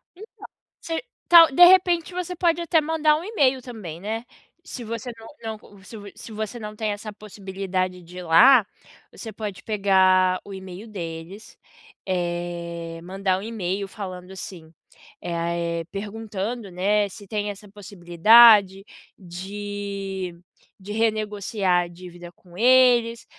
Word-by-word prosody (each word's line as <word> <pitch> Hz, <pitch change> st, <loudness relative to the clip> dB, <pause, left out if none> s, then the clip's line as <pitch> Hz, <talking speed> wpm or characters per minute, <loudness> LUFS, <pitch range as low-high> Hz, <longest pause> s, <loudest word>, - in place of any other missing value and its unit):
Então, 405 Hz, +5 st, -11 dB, 0.6 s
se 330 Hz, +4 st, -4 dB, 0.2 s
tal, 335 Hz, -3 st, +8 dB
de 350 Hz, +6 st, +8 dB
repente 355 Hz, -1 st, +4 dB
você 360 Hz, 0 st, -4 dB
pode 345 Hz, -1 st, +1 dB
até 325 Hz, -1 st, +2 dB
mandar 310 Hz, -1 st, +2 dB
um 320 Hz, -, -7 dB
e-mail 275 Hz, -, +1 dB
também, 215 Hz, -10 st, -9 dB
né. 220 Hz, +4 st, -4 dB, 0.4 s
Se 265 Hz, -8 st, -8 dB
você 230 Hz, +2 st, -6 dB
não 225 Hz, -, -12 dB, 0.3 s
não 205 Hz, -2 st, -18 dB
se 225 Hz, -, -12 dB
vo 205 Hz, -1 st, -11 dB
se 225 Hz, -, -11 dB
você 215 Hz, +2 st, -5 dB
não 210 Hz, -1 st, -8 dB
tem 215 Hz, 0 st, -2 dB
essa 210 Hz, +1 st, -7 dB
possibilidade 190 Hz, -3 st, -4 dB
de 175 Hz, +1 st, -13 dB
ir 180 Hz, -, -6 dB
lá, 220 Hz, +8 st, +6 dB, 0.5 s
você 220 Hz, -, -9 dB
pode 205 Hz, -3 st, -7 dB
pegar 190 Hz, -3 st, +3 dB
o 200 Hz, -, -10 dB
e-mail 190 Hz, +3 st, -10 dB
deles, 175 Hz, 0 st, -8 dB, 0.5 s
eh, 175 Hz, -2 st, -4 dB
mandar 190 Hz, +1 st, -1 dB
um -, -, -8 dB
e-mail 200 Hz, -3 st, -3 dB
falando 185 Hz, -2 st, -8 dB
assim, 175 Hz, -4 st, -10 dB, 0.5 s
eh 170 Hz, -, -4 dB
ah 170 Hz, 0 st, -2 dB
eh, 170 Hz, -1 st, -2 dB
perguntando, 210 Hz, +1 st, -5 dB
né, 205 Hz, +3 st, +1 dB
se 200 Hz, +1 st, -13 dB
tem 210 Hz, 0 st, -3 dB
essa 205 Hz, +1 st, -13 dB
possibilidade 200 Hz, +1 st, +5 dB, 0.3 s
de 195 Hz, 0 st, -6 dB, 0.4 s
de 195 Hz, +2 st, -9 dB
renegociar 210 Hz, -4 st, 0 dB
a -, -, -9 dB
dívida 175 Hz, 0 st, -12 dB
com 175 Hz, 0 st, -18 dB
eles, 240 Hz, -1 st, +4 dB
200 Hz, 145 wpm, -23 LUFS, 185-225 Hz, 0.6 s, tal